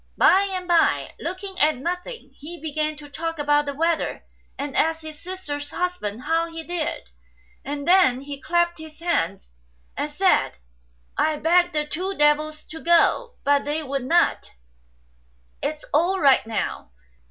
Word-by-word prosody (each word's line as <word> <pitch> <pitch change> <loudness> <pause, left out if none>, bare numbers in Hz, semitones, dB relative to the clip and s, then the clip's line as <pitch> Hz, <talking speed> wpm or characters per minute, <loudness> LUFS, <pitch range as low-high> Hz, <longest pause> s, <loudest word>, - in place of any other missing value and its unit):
By 395 +1 +5
and 365 -1 -4
by, 345 -2 +2
looking 370 +2 -5
at 305 0 +4
nothing, 360 - -5
he 330 +4 -9
began 310 0 -2
to 295 0 -11
talk 325 +3 -4
about 295 0 +2
the 280 - -3
weather, 330 +2 -1 0.3
and 280 -1 -4
ask 320 0 +1
his 310 -1 -9
sister's 295 -6 -5
husband 315 - -3
how 330 +1 +1
he 330 0 -7
did, 340 -2 -3 0.6
and 285 +1 -5
then 350 -9 +5
he 280 0 -8
clapped 345 +1 +1
his 315 0 -11
hands, 195 - -1 0.4
and - - -2
said, - - +2 0.4
" - - -38 0.3
I 310 -1 +2
begged 350 +3 +3
the 300 -1 0
two 370 +6 -3
devils 305 +1 +2
to 320 - -10
go, 345 +8 +3
but 285 0 +3
they 300 +2 -2
would 275 -2 -3
not; 345 +6 +1 1.1
it's 305 0 -3
all 350 +6 +3
right 275 -7 +4
now." 225 - -3
315 Hz, 155 wpm, -24 LUFS, 290-345 Hz, 1.1 s, By